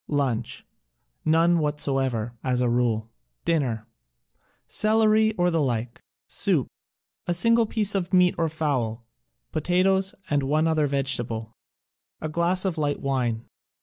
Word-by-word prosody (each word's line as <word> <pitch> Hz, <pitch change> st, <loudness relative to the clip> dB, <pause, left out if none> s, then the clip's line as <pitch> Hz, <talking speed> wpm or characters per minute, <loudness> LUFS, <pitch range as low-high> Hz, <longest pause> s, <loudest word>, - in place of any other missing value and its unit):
Lunch: 130 Hz, -6 st, -2 dB, 0.6 s
None 165 Hz, +2 st, +4 dB
whatsoever, 135 Hz, -6 st, -1 dB
as 125 Hz, -1 st, 0 dB
a 125 Hz, -, +2 dB
rule. 115 Hz, -2 st, 0 dB, 0.3 s
Dinner: 130 Hz, -10 st, 0 dB, 0.8 s
Celeiy 220 Hz, 0 st, +3 dB
or 175 Hz, 0 st, +2 dB
the 165 Hz, -1 st, +1 dB
like, 120 Hz, -3 st, -2 dB, 0.3 s
soup, -, -, +1 dB, 0.6 s
a 175 Hz, -, +1 dB
single 230 Hz, +5 st, +4 dB
piece 210 Hz, -2 st, 0 dB
of 185 Hz, -3 st, -2 dB
meat 180 Hz, -1 st, +4 dB
or 165 Hz, -1 st, 0 dB
fowl, 130 Hz, -8 st, -2 dB, 0.5 s
potatoes 185 Hz, +4 st, +1 dB
and 145 Hz, -1 st, +1 dB
one 150 Hz, +4 st, +1 dB
other 155 Hz, -2 st, +2 dB
vegetable; 120 Hz, -5 st, -1 dB, 0.7 s
a 155 Hz, -, -4 dB
glass 170 Hz, +4 st, 0 dB
of 175 Hz, -4 st, -1 dB
light 145 Hz, -1 st, 0 dB
wine. 120 Hz, -4 st, -1 dB
150 Hz, 125 wpm, -25 LUFS, 125-175 Hz, 0.8 s, None